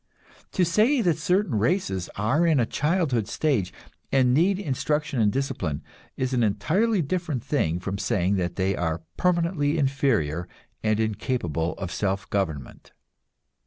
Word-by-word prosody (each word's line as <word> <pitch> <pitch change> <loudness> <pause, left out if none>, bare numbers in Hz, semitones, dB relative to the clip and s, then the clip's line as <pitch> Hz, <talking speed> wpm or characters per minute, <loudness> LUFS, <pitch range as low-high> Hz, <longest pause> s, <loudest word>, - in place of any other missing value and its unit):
To 180 - +3
say 215 - +3
that 170 -4 +1
certain 180 - +1
races 100 - 0
are 135 +12 +2
in 155 -4 +4
a 120 - +3
childhood 150 - 0
stage, 120 - 0 0.4
and 130 -2 +4
need 180 +7 +3
instruction 150 - -1
and 105 -1 +3
discipline, 135 - -2 0.3
is 130 0 -1
an 125 - +2
entirely 170 - +1
different 155 -5 -2
thing 85 - 0
from 100 +2 -4
saying 100 -2 +1
they 95 +2 0
are 80 -1 -2
permanently 170 -4 +1
inferior 120 - +1 0.3
and 110 -1 +1
incapable 100 - -1
of 95 -3 -6
self 95 +1 -1
government. 80 -10 -3
125 Hz, 135 wpm, -25 LUFS, 95-160 Hz, 0.4 s, in